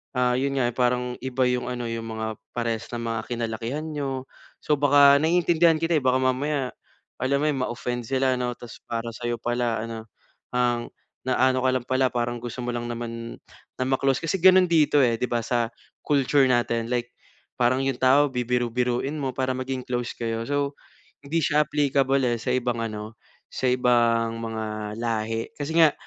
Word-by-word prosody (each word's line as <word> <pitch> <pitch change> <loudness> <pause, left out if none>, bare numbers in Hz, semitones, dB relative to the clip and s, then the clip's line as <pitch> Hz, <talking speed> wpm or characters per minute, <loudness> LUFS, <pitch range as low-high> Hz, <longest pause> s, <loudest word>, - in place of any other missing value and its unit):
ah, 125 -1 +2
yun 140 +1 0
nga, 120 -2 +2
eh, 120 - -9
parang 125 0 0
iba 130 0 0
yung 125 0 -1
ano 120 -1 -4
yung 115 0 -4
mga 110 0 -4 0.2
parehas 115 -2 -2
na 120 - -2
mga 115 -1 -2
kinalakihan 115 +5 -3
niyo. 135 -4 -4 0.3
So 150 - +2
baka 140 0 +6
naiintindihan 165 0 +3
kita, 165 0 +2
eh. 145 - -2
Baka 130 0 +3
mamaya 130 +1 0 0.5
alam 135 +2 +1
mo, - - +2
eh, 150 - 0
ma-offend 120 0 -4
sila 130 0 +1
'no. 125 -1 -1
Tapos 120 -2 -10
para 115 0 -3
sa'yo 120 +1 -3
pala 120 -2 -1
ano, 115 -1 -6 0.5
ang 120 -1 0 0.3
naano 130 0 +2
ka - - +5
lang 130 -2 -1
pala 130 0 +2
parang 120 0 -1
gusto 120 +1 -6
mo - - -2
lang 120 0 -3
naman 115 0 -5 0.4
na 130 - 0
ma 135 - +2
close. 135 -1 +1
Kasi 165 +3 0
ganun 185 0 +7
dito, 155 -3 +4
eh, 115 -2 +2
'di 125 - 0
ba 120 -1 +1
sa 120 0 0 0.4
culture 140 -1 +3
natin. 120 -2 +1
Like, 120 0 -1 0.5
parang 130 +2 +3
yung 135 -2 -1
tao 135 +3 +5
bibiru-biruin 125 +2 -1
mo 135 -2 -2
para 130 0 0
maging 130 0 -4
close 120 -1 -2
kayo. 115 -1 -2
So 145 0 0 0.5
hindi 155 +4 -1
siya 150 0 +3
applicable 140 -2 +2
eh 120 -1 0
sa 125 - -3
ibang 120 -2 0
ano, 110 0 -5 0.3
sa 130 - -1
ibang 115 -2 +2
mga 110 -1 -4
lahi. 115 -1 -2
Kasi 150 +3 -3
nga 160 -3 +6
125 Hz, 180 wpm, -25 LUFS, 120-135 Hz, 0.5 s, ganun